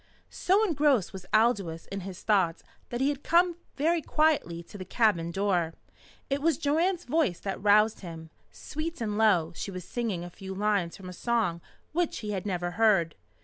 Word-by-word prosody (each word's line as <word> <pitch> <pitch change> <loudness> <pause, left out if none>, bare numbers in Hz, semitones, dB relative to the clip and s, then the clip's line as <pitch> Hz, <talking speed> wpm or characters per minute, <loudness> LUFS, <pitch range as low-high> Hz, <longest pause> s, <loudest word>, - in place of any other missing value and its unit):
So 390 +4 +2
engrossed 290 - +2
was 190 -1 -9
Aldous 205 -8 +2
in 195 - -3
his 190 0 -8
thoughts 190 -6 +2 0.3
that 240 +1 -3
he 275 - +3
had 285 -1 -3
come 345 +2 +3 0.2
very 325 +4 +1
quietly 300 - +1
to 170 - -16
the 190 - -6
cabin 185 -6 +1
door. 175 -3 0 0.5
It 275 +1 -1
was 325 +1 +2
Joanne's 330 +4 +1
voice 295 - +1
that 195 - -4
roused 210 +2 +4
him. 165 -3 -9 0.2
Sweet 320 +3 -5
and 215 -3 -2
low 190 -7 +3
she - - -4
was 185 -2 -7
singing 220 -8 -3
a 175 - -8
few 190 +2 -8
lines 200 -4 0
from 190 - -10
a - - -8
song 210 -5 0 0.3
which 345 +1 0
he 210 - -2
had 195 0 -3
never 175 -2 -2
heard. 195 -5 +3
210 Hz, 185 wpm, -28 LUFS, 180-285 Hz, 0.5 s, roused